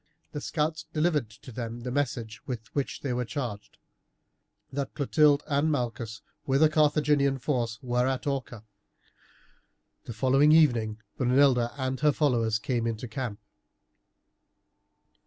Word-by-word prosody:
The 145 - -5
scouts 155 +1 -2
delivered 150 -6 +1
to 115 +3 -13
them 115 0 -5
the 125 +1 -4
message 120 -6 -2
with 120 -2 -6
which 140 -2 -2
they 135 -3 -2
were 125 0 -1
charged: 120 -5 -5 1.0
that 140 0 -3
Clotilde 145 0 +3
and 145 +2 +1
Malchus, 115 -5 -3 0.2
with 135 +3 +3
a 155 - +6
Carthaginian 150 -2 +3
force, 120 -4 -1
were 125 0 +1
at 135 +2 -2
Orca. 130 -5 -3 1.4
The 120 - -6
following 135 +6 +4
evening 120 -9 +3 0.2
Brunilda 125 -2 +3
and 130 -1 -2
her 150 +2 +4
followers 120 -7 +1
came 120 -2 -1
into 115 +2 -3
camp. 115 -2 -5
130 Hz, 130 wpm, -28 LUFS, 120-145 Hz, 1.4 s, a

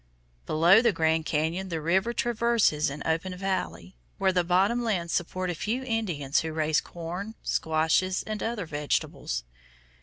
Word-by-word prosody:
Below 170 +7 +6
the 235 -1 +4
Grand 160 -2 +1
Cañon 165 +5 -1
the 165 -2 -2
river 190 +8 +1
traverses 235 -10 +2
an 140 +2 -6
open 180 +3 -1
valley, 90 - -3 0.2
where 190 -1 +2
the 180 -1 +2
bottom 195 +7 +2
lands 180 -7 -1
support 185 +1 -1
a - - -2
few 225 +10 -2
Indians 175 - 0
who 160 - -3
raise 155 -1 +1
corn, 180 +6 -6
squashes, 160 +4 +1
and 215 -1 -5
other 225 -4 -2
vegetables. 150 - -2
180 Hz, 150 wpm, -27 LUFS, 160-210 Hz, 0.2 s, Below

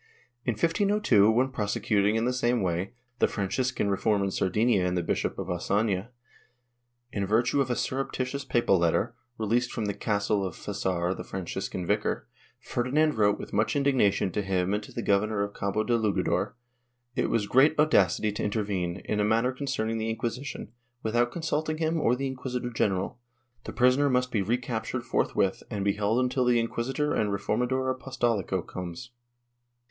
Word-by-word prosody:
In 120 - +1
1502, 165 - +3
when 125 +4 +2
prosecuting, 105 -2 +1
in 115 +1 +1
the 125 - +1
same 120 -3 +1
way, 90 +4 -2 0.2
the - - +4
Franciscan 105 +3 -1
reform 100 +1 +1
in 100 - -1
Sardinia 105 +2 +2
and 90 0 0
the 90 - 0
Bishop - - -1
of - - -3
Ocafia, 100 +3 0 1.0
in 100 -2 -2
virtue 120 +6 +2
of 130 - -1
a 120 - +1
surreptitious 135 +1 -2
papal 120 -7 +2
letter, 85 +7 +1 0.2
released 115 +3 0
from 115 - -2
the 100 - -1
castle 100 0 0
of 95 -3 -4
Fasar 95 -3 -2
the - - -6
Franciscan 95 0 -4
vicar, - - -1 0.3
Ferdinand 150 +5 +1
wrote 105 -2 +3
with - - -9
much 110 +7 +1
indignation 130 -9 +2
to 105 - -1
him 95 -1 0
and 105 - 0
to - - -12
the - - -4
governor 100 +1 +2
of 100 0 -4
Cabo 100 +2 -1
de 120 +1 +1
Lugador; 110 -2 0 0.6
it 125 - +1
was 115 -3 +1
great 135 +8 +4
audacity 110 - +3
to 105 - -4
intervene, 100 -4 -2
in 105 - -1
a - - +3
matter 115 +4 +2
con 140 +2 -6
cerning 115 -3 -1
the 110 0 -2
Inquisition, 120 +5 -4 0.3
without 120 +2 +1
consulting 155 -1 -2
him 160 0 0
or 120 -2 +3
the 135 +2 -3
inquisitor 125 -2 -4
general; 100 0 -1 0.5
the - - -5
prisoner 130 +3 +3
must 125 0 +1
be 105 - +1
recaptured 120 +2 -2
forth^^•ith 95 -4 0
and 100 -4 -3
be 100 - +3
held 105 +3 +1
until 125 0 +1
the 120 -1 +4
inquisitor 130 +6 -1
and 105 -2 +1
reformador 125 +6 0
apostolico 120 -9 -1
comes. 90 +7 -7
110 Hz, 170 wpm, -28 LUFS, 100-125 Hz, 1.0 s, the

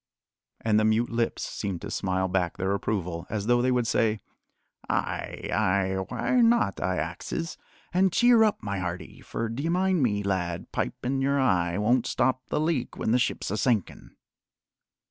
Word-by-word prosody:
And 110 -1 +3
the - - +2
mute 110 +2 +2
lips 115 0 -1
seemed 95 -5 -4
to - - -6
smile 95 -1 0
back 90 -2 -1
their 95 +1 0
approval, 90 -4 -2
as 105 -1 -3
though 120 +1 +3
they 130 - +2
would 125 -2 +1
say: 110 -1 +1 0.7
"Ay, - - -2
ay, 95 0 +1 0.2
wrhy 250 -2 +2
not, 230 - +3
I 95 0 0
axes? 90 - -4 0.4
An' 190 +2 +4
cheer 240 +4 +5
up, 215 - +1
my 100 -2 -2
hearty, 90 0 -5
for, 115 - -3
d'ye 135 +9 -3
mind 185 -1 +2
me, 105 -5 +1
lad, 90 -3 -2
pipin' 135 +2 -2
your 140 +1 +2
eye 90 -9 +2
won't 115 +4 +2
stop 130 0 +1
the - - -1
leak 155 -5 -1
when - - -1
the 125 - +4
ship's 120 - -1
a 105 - -1
sinkin'." 110 -3 -1
110 Hz, 170 wpm, -27 LUFS, 95-135 Hz, 0.7 s, cheer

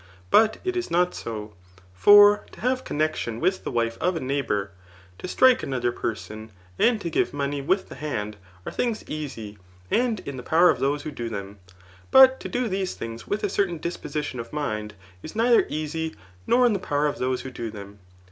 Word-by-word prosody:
But 220 0 +5
it 370 -1 -2
is 360 -1 -2
not 180 +1 +2
so; 105 -2 -6 0.4
for 205 - +7
to - - -13
have 255 +1 0
connexion 150 -7 -2
with 185 +3 0
the - - -3
wife 115 -1 -1
of 180 0 +1
a - - -2
neighbour, 130 -8 -2 0.5
to - - -6
strike 255 +6 +4
another 125 -3 -1
person, 110 -1 -5 0.3
and 235 -2 +3
to 170 - -4
give 145 - 0
money 140 0 -2
with 185 +8 0
the - - -10
hand, 105 -8 -4 0.3
are - - -4
things 235 -3 -2
easy, 115 -9 -6 0.3
and 235 -3 +1
in 140 -2 -7
the - - -5
power 170 +7 +5
of 125 - -4
those 140 +2 0
who 155 - -5
do 120 -4 -5
them 100 -2 -7
j 95 - -21 0.4
but 265 0 +7
to - - -6
do 245 -1 -1
these 190 -2 -2
things 115 0 -7
With 205 - -2
a - - +2
certain 185 -3 0
disposition 150 -5 -4
of 115 0 -7
mind,' 105 -8 -3 0.3
is 155 - -9
neither 235 +1 +4
easy, 155 +1 -3 0.3
nor 250 +1 +4
in 235 - +4
the 200 - -1
power 145 -3 0
of 145 - -1
those 130 0 -1
who 130 - -7
do 120 -2 -5
them. 100 -1 -10
150 Hz, 205 wpm, -25 LUFS, -, 0.5 s, for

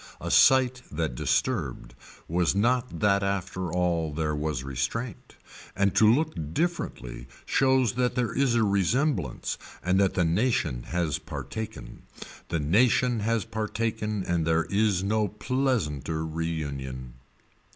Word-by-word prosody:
A - - -4
sight 130 -1 +5
that 80 -3 -2
disturbed - - -1 0.3
was 85 +2 +1
not 125 +4 +1
that 100 -1 +3
after 95 -2 -2
all 85 -3 0
there 75 0 -1
was 75 -3 -2
restraint 70 - -4 0.4
and 95 0 +2
to 110 0 +6
look 155 +6 +1 0.2
differently 65 - -3 0.2
shows 130 -2 +3
that 125 0 0
there 125 -3 0
is 130 -3 +2
a 115 - +3
resemblance 100 - 0 0.2
and 90 +2 +2
that 95 -1 +2
the 90 - +2
nation 85 - 0
has 85 -4 -1
partaken. 110 - -7 0.5
The 80 - 0
nation 115 - +3
has 110 -1 0
partaken 105 -1 -2
and 85 -2 0
there 80 +1 +2
is 100 -2 +2
no 105 +1 +1
pleasanter 105 - -1
reunion. 70 -6 -4
95 Hz, 130 wpm, -27 LUFS, 80-115 Hz, 0.5 s, to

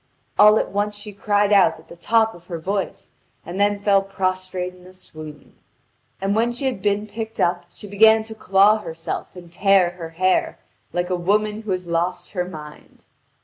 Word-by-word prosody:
All 210 +1 +8
at - - -1
once 205 +1 -1
she 205 0 -9
cried 205 +1 +1
out 185 -5 +5
at 160 - -18
the - - -12
top 225 +5 +2
of 175 0 -16
her 170 - -4
voice, 195 +4 -4 0.3
and 175 +3 -6
then 205 0 +2
fell 200 -1 +3
prostrate 185 -1 -3
in 180 0 -17
a 185 - -15
swoon. 155 -4 -12 0.7
And 195 +1 0
when 230 +2 +2
she 245 +3 -5
had 255 -8 -2
been 205 +1 0
picked 220 +1 -7
up 175 0 +1
she 190 - -13
began 220 +2 +5
to 220 0 -9
claw 205 0 +4
herself 165 -1 -6
and 175 -2 -12
tear 195 -2 +3
her 170 -2 -8
hair, 185 +3 0 0.3
like 175 +1 -2
a - - +2
woman 210 +4 0
who 220 - -10
had 185 -1 -2
lost 170 +2 -2
her 180 -3 -2
mind. 150 -4 -12
195 Hz, 190 wpm, -22 LUFS, 175-210 Hz, 0.7 s, All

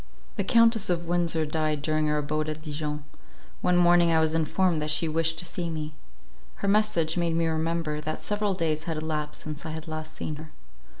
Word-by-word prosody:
The - - 0
Countess 230 -3 +4
of 170 -1 0
Windsor 170 -2 +1
died 155 -1 -1
during 155 0 +1
our 150 - +1
abode 155 +1 -1
at 155 0 -5
Dijon. 150 -1 -4 0.6
One 180 0 +3
morning 175 -1 +5
I 160 - +4
was 160 0 +2
informed 165 +1 +1
that 150 - -1
she 160 +2 +2
wished 165 +1 +1
to 175 - -2
see 175 -1 -3
me. 155 -1 -4 0.6
Her - - -4
message 200 -6 +2
made 170 -1 +1
me 165 0 +2
remember, 160 -1 -1
that 155 +1 -3
several 205 -1 -1
days 155 -3 -1
had 165 -3 -2
elapsed 155 -1 -3
since 150 -1 -6
I 160 - -5
had 160 +1 -6
last 155 0 -6
seen 150 - -4
her. 155 +1 -10
160 Hz, 200 wpm, -27 LUFS, 155-170 Hz, 0.6 s, morning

